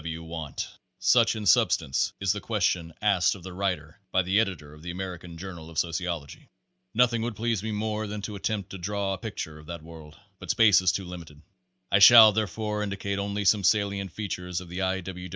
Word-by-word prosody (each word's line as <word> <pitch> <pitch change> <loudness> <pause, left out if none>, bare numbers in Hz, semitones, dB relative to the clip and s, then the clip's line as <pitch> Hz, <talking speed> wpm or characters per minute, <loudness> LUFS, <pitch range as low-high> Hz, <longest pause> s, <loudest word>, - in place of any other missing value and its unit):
W. 80 0 -5
W. 80 - -11
want?" 80 -4 -5 0.3
Such, 120 -2 +4
in 110 -1 -5
substance, 65 -7 +3
is 95 0 +1
the 105 - -5
question 90 -6 0
asked 100 -4 +3
of 95 - -12
the 95 0 -8
writer 90 -5 -3
by 95 - +2
the 95 +4 +2
editor 80 -9 -2
of 75 - -15
the 85 - -7
American 90 -2 -6
Journal 85 -3 -8
of 80 - -11
Sociology. 85 -3 -3 0.5
Nothing 120 -1 +3
would 115 -1 -3
please 115 -1 -1
me 110 +1 -4
more 110 0 -2
than 105 0 -6
to 105 - -5
attempt 100 -1 -3
to 95 - -7
draw 100 +1 -2
a 95 - -6
picture 90 -9 -6
of 75 - -15
that 85 -2 -7
world; 80 -2 -12 0.2
but - - -10
space 105 -5 +5
is 95 -2 +3
too 95 0 -4
limited. 85 -4 -10 0.5
I 100 - +5
shall, 110 +1 +10
therefore, 105 +1 -2
indicate 100 -1 -3
only 100 0 -2
some 100 +1 +4
salient 100 -1 +1
features 90 -3 -4
of 90 -2 -11
the 90 +3 -4
I. 95 0 0
W. 90 0 -7
95 Hz, 210 wpm, -27 LUFS, 85-105 Hz, 0.5 s, shall